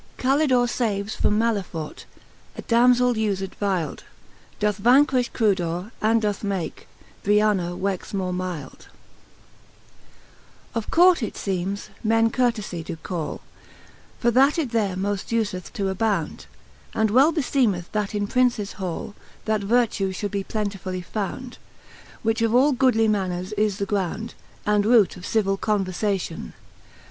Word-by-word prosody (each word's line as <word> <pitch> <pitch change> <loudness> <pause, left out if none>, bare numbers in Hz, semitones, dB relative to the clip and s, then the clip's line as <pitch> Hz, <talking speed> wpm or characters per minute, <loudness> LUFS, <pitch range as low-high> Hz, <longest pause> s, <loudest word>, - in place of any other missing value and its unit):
CaVtdore 260 -2 +3
faves 215 -4 -1
from 210 - +1
Maleffart 200 -8 -2 0.5
A - - -6
Damzell 245 +1 +4
ufed 200 -4 -1
vylde) 185 -6 -1 0.6
Doth 210 -1 0
vanqn'tjh 255 +1 +4
Crudor^ 185 -3 0
and 220 +1 +3
doth 205 -1 -1
make 195 -6 -3 0.4
Briana 205 -4 +2
"joexe 195 -2 -2
wore 185 -2 -1
mylde, 180 -6 -5 1.9
I. - - -2
OF 220 - -8
Court, 355 -2 +5
it 220 - -3
feemes, 195 +1 -3
men 225 +1 +3
Courtefie 220 -9 -1
doe 160 - -5
call, 165 -5 -4 0.8
For 240 - +2
that 270 +6 +4
it 290 -8 -1
there 210 -5 0
moft 195 +1 -2
ufeth 185 -5 -4
to 195 -2 -1
abound 190 -4 -1
j - - -13 0.5
And 220 -1 +3
well 270 +8 +6
befeemeth, 250 - 0
that 210 -1 -2
in 205 0 0
Princes 240 -3 +1
hall 185 +2 -4 0.3
That 215 -1 +1
vertue 210 -3 +1
fhould 205 +2 -4
be 200 -1 -2
plentifully 195 -3 -3
found, 225 +6 -5 0.6
Which 225 +1 +1
of 230 0 +2
all 275 +4 +5
goodly 250 -4 +3
manners 185 -2 -1
is 210 -1 0
the 200 - -1
ground. 205 +3 -2 0.3
And 210 0 +3
roote 220 -2 +4
of 180 -1 -8
civill 195 -3 +1
converiation. 195 -4 -2
210 Hz, 135 wpm, -24 LUFS, 190-230 Hz, 1.9 s, well